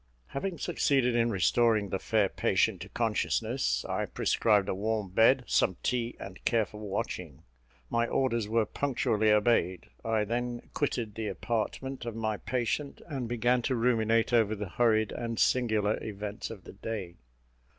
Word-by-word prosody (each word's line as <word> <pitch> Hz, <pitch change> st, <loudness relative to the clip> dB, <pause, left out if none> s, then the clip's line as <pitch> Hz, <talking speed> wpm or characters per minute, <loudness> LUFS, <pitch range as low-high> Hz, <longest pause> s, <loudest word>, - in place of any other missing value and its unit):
Having 170 Hz, +6 st, -3 dB
succeeded 135 Hz, -7 st, +1 dB
in 120 Hz, 0 st, +3 dB
restoring 110 Hz, +1 st, +2 dB
the 95 Hz, -, -2 dB
fair 105 Hz, -1 st, +2 dB
patient -, -, +1 dB
to -, -, -8 dB
consciousness, -, -, 0 dB
I -, -, -1 dB
prescribed 105 Hz, -3 st, +2 dB
a -, -, 0 dB
warm 105 Hz, +1 st, -1 dB
bed, 115 Hz, +7 st, +4 dB
some 95 Hz, -, +2 dB
tea, 120 Hz, -1 st, -1 dB
and 95 Hz, -1 st, -9 dB
careful 110 Hz, -2 st, 0 dB
watching. 90 Hz, -7 st, -4 dB, 0.4 s
My 115 Hz, -, +1 dB
orders 115 Hz, -5 st, 0 dB
were 110 Hz, 0 st, +2 dB
punctually 110 Hz, -5 st, 0 dB
obeyed; 105 Hz, -4 st, +2 dB
I 110 Hz, -1 st, +1 dB
then 120 Hz, +2 st, -3 dB
quitted 120 Hz, -7 st, -1 dB
the 110 Hz, 0 st, -4 dB
apartment 120 Hz, +4 st, -3 dB
of 115 Hz, -, -4 dB
my 110 Hz, -2 st, -1 dB
patient, 130 Hz, +5 st, -2 dB
and 135 Hz, -7 st, -4 dB
began 120 Hz, +1 st, +2 dB
to 130 Hz, +2 st, 0 dB
ruminate 115 Hz, -1 st, +2 dB
over 110 Hz, -2 st, +3 dB
the 105 Hz, -2 st, -5 dB
hurried 110 Hz, 0 st, +2 dB
and 115 Hz, -1 st, -4 dB
singular 110 Hz, -5 st, +2 dB
events 105 Hz, +1 st, -5 dB
of 105 Hz, -5 st, -9 dB
the -, -, -11 dB
day. 100 Hz, -4 st, -5 dB
115 Hz, 150 wpm, -29 LUFS, 105-120 Hz, 0.4 s, bed